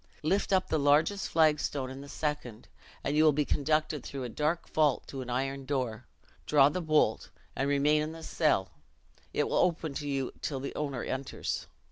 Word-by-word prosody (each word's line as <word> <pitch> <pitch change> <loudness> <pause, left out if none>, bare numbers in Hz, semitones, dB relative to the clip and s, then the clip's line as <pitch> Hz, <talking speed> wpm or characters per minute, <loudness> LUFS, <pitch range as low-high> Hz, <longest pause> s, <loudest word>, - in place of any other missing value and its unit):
Lift 195 +7 +1
up 190 -1 +3
the 155 - +1
largest 150 +8 +3
flag 155 -2 +4
stone 130 -3 -3
in 135 +1 -8
the 140 - -10
second, 145 -8 -4 0.4
and 145 - -1
you 155 - +5
will 155 - +7
be 150 0 0
conducted 155 -1 0
through 135 -2 -5
a 125 - -4
dark 155 +8 -1
vault 150 -4 +2
to 135 - -6
an 125 - -7
iron 135 +2 -2
door; 130 -5 -3 0.4
draw 140 -2 +6
the 180 +5 -3
bolt, 155 -8 +2 0.3
and 135 +1 0
remain 145 +2 +3
in 155 +1 -3
the 165 0 -10
cell 150 - +1 0.6
it - - 0
will - - 0
open 165 -4 +1
to 145 +1 -4
you 135 -2 -1
till 135 -3 -2
the 135 - -5
owner 140 -5 -3
enters. 130 +1 -3
145 Hz, 195 wpm, -30 LUFS, 135-155 Hz, 0.6 s, will